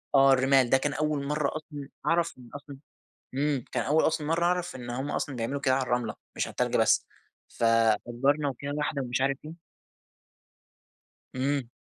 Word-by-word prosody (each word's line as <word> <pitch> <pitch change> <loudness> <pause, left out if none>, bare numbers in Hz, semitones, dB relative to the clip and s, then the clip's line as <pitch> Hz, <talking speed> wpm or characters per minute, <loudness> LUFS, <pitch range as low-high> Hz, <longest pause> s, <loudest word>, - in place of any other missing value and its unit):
آه 135 0 +7
الرمال 130 -1 +4
ده 135 - +5
كان 145 +2 -1
أول 150 -2 -1
مرّة 150 -1 0
أصلًا 145 -3 -9 0.2
أعرف 170 0 +2
إن 125 -2 -14
أصلًا 145 -1 -9 0.6
امم، 140 -2 0
كان 125 - 0
أول 150 +6 +3
أصلًا 155 -2 -1
مرّة 170 +2 +1
أعرف 180 -2 0
إن 120 -1 -7
هم 130 +4 -3
أصلًا 135 - -2
بيعملوا 120 +5 -3
كده 130 -2 +2
على 135 - +1
الرملة 120 -3 -1 0.2
مش - - -1
على - - -7
التلج - - 0
بس. - - +3 0.4
فأجرنا 120 +5 +2
وكده 140 +2 -6
واحدة 150 -1 -1
ومش 125 0 -2
عارف 135 0 +1
إيه 160 - -7 1.8
امم. 135 -1 -1
135 Hz, 175 wpm, -28 LUFS, 125-150 Hz, 1.8 s, آه